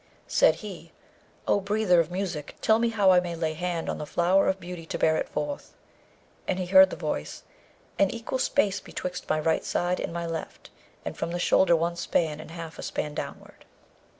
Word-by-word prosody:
Said - - +4
he, - - -9 0.6
'O - - +3
breather 200 -2 +2
of 165 -1 +1
music, 180 -5 -4
tell 220 0 +3
me 235 0 +2
how 205 -4 +4
I 180 - +6
may 175 -1 -4
lay 160 -1 -1
hand 170 0 -3
on - - -3
the 150 - -5
flower 180 +5 +3
of 190 - -1
beauty 175 -1 -7
to - - -3
bear 160 0 +3
it - - -2
forth.' 290 -1 -4 0.7
And 185 - 0
he 185 - -2
heard 190 +1 +7
the - - -5
voice, 150 - -4 0.6
'An 195 - +5
equal 230 +4 -4
space 200 -8 +2
betwixt 180 -2 -6
my 155 - +2
right 160 +1 +1
side 175 +1 0
and - - -3
my 170 0 -3
left, 165 -1 -6 0.3
and - - -4
from - - -3
the 175 - -2
shoulder 175 0 +4
one 170 +1 0
span 160 -3 0
and 155 - -9
half 165 -1 -8
a - - -4
span 150 -1 -3
downward.' - - -7
175 Hz, 205 wpm, -27 LUFS, 165-190 Hz, 0.7 s, heard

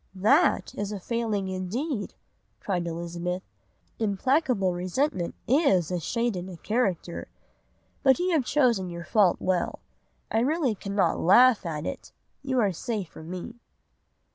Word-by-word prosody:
"'That 245 - +3
is 205 0 -4
a 205 - -4
failing 220 -2 -2
indeed,' 205 - -3 0.4
cried 175 -4 -2
Elizabeth. 170 +2 -4 0.6
'Implacable 225 - +1
resentment 180 - -1
is 215 - +3
a 180 - 0
shade 235 +5 -1
in 180 +1 -5
a 180 - -9
character. 195 -5 -1 0.7
But 265 -1 +5
you 360 +1 0
have 315 -6 +3
chosen 240 -9 +2
your 170 -1 -7
fault 200 -5 +3
well. 185 -1 0 0.5
I 220 - +2
really 275 0 +1
cannot 195 -3 0
laugh 235 +2 +5
at 155 -1 -4
it. - - -6 0.3
You 265 -2 0
are 205 -4 +3
safe 200 0 -4
from 160 +1 -11
me. 185 +7 -7
200 Hz, 140 wpm, -27 LUFS, 180-250 Hz, 0.7 s, But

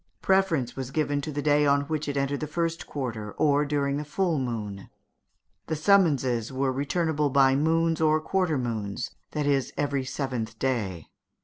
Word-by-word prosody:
Preference 180 -10 +2
was 130 -2 -4
given 145 0 0
to 155 - -5
the 145 0 -3
day 150 0 +4
on 140 0 +4
which 155 +1 -3
it 140 -1 -2
entered 140 +1 0
the 155 - -3
first 165 +2 -2
quarter, 115 -7 -4
or 145 -1 +2
during 140 -1 0
the 150 - -3
full 165 +1 0
moon; 105 -6 -4 0.8
the 160 - -1
summonses 145 - +3
were 130 0 0
returnable 150 +2 0
by 135 -1 +4
moons 165 +2 +2
or 155 0 +4
quarter 180 -1 0
moons 115 -2 -3 0.2
that 150 -1 -1
is, 140 -2 +1
every 140 -2 0
seventh 125 -5 -4
day. 105 -11 -2
140 Hz, 170 wpm, -27 LUFS, 130-155 Hz, 0.8 s, day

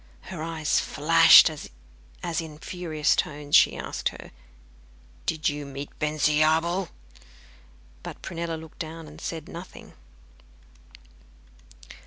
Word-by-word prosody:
Her 165 - -6
eyes 160 -2 0
flashed, 165 +2 +7
as 65 - -7
in 155 -2 -9
furious 160 -2 -1
tones 145 -1 -1
she - - +6
asked - - -3
her, - - -12 1.0
'Did 160 -1 0
you 145 0 -2
meet 140 0 -7
Bensiabel?' 155 +4 +1 1.1
But - - -9
Prunella 170 -1 -4
looked 160 0 -14
down, 160 0 -7
and 155 +2 -13
said 160 -2 -5
nothing. 175 +2 -11
155 Hz, 105 wpm, -26 LUFS, 150-165 Hz, 1.1 s, flashed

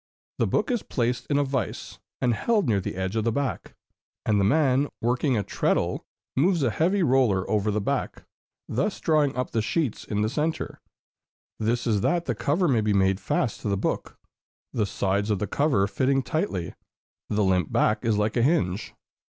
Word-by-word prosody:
The - - +2
book - - 0
is 240 -4 0
placed 125 -1 -2
in 145 - +1
a 145 - +3
vise, 135 -2 -3 0.2
and 120 -1 +2
held 215 - +1
near 105 -4 +2
the - - -5
edge 95 +2 -3
of 110 - +1
the 115 - +1
back; 140 +3 -3 0.5
and 105 -2 +2
the - - +3
man, 140 +4 +3
working 125 +2 +1
a 105 - 0
treadle, - - -1 0.3
moves 170 +3 +2
a 125 - +2
heavy 180 - +1
roller 125 - +2
over 105 0 +1
the 105 0 0
back, - - -2 0.4
thus 190 - -1
drawing 150 -5 +2
up 125 -1 -2
the 115 - +1
sheets 115 +4 -1
in 105 0 -1
the - - +2
centre; 155 +5 -2 0.8
this 115 +2 0
is 105 -4 +1
that 175 - +1
the 125 - 0
cover 145 - +1
may 120 -7 +3
be 105 -1 +1
made 95 -1 +2
fast 110 +3 -1
to 105 - -2
the 100 - +1
book, - - -3 0.6
the 105 -3 0
sides 100 +2 -1
of 105 - +2
the 105 - -2
cover 130 -2 +2
fitting 135 +6 +1
tightly; 125 - -2 0.6
the 105 0 +1
limp 90 -4 +1
back 105 +3 +2
is 115 -3 +1
like 105 +1 0
a 120 - +2
hinge. 105 - 0
115 Hz, 190 wpm, -26 LUFS, 105-140 Hz, 0.8 s, a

